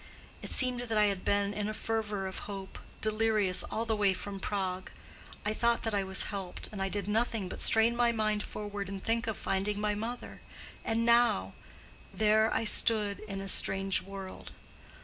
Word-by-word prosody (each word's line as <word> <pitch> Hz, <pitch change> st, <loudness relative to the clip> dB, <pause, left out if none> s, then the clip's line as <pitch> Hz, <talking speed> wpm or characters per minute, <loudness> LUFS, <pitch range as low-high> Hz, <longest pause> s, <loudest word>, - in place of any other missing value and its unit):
It -, -, -6 dB
seemed 255 Hz, -2 st, +5 dB
that 230 Hz, -3 st, -2 dB
I 210 Hz, -, +5 dB
had 185 Hz, -, -10 dB
been 200 Hz, 0 st, +1 dB
in 210 Hz, 0 st, -2 dB
a 215 Hz, -, -4 dB
fever 215 Hz, -4 st, -2 dB
of 190 Hz, -, -5 dB
hope—delirious—all 215 Hz, +1 st, -1 dB
the 225 Hz, -1 st, 0 dB
way 205 Hz, -2 st, +2 dB
from 195 Hz, +1 st, -7 dB
Prague: 190 Hz, -2 st, -3 dB, 0.6 s
I 210 Hz, -, 0 dB
thought 235 Hz, +1 st, +1 dB
that 225 Hz, -, -1 dB
I 200 Hz, -1 st, +1 dB
was 190 Hz, 0 st, 0 dB
helped, 190 Hz, -3 st, -4 dB
and 205 Hz, -2 st, -6 dB
I 195 Hz, -, 0 dB
did 200 Hz, -1 st, -2 dB
nothing 220 Hz, -1 st, 0 dB
but -, -, -6 dB
strain 225 Hz, +1 st, +5 dB
my 240 Hz, 0 st, +3 dB
mind 215 Hz, -2 st, 0 dB
forward 205 Hz, -2 st, -6 dB
and 195 Hz, -1 st, -6 dB
think 230 Hz, 0 st, 0 dB
of 220 Hz, -, -2 dB
finding 200 Hz, +2 st, -2 dB
my 210 Hz, 0 st, 0 dB
mother; 230 Hz, +4 st, -6 dB, 0.4 s
and 230 Hz, 0 st, 0 dB
now—there 220 Hz, -, +1 dB
I -, -, 0 dB
stood 210 Hz, -2 st, +3 dB
in 195 Hz, -2 st, -6 dB
a 195 Hz, -, -6 dB
strange 195 Hz, 0 st, +3 dB
world. 195 Hz, -1 st, -9 dB
210 Hz, 175 wpm, -30 LUFS, 195-225 Hz, 0.6 s, seemed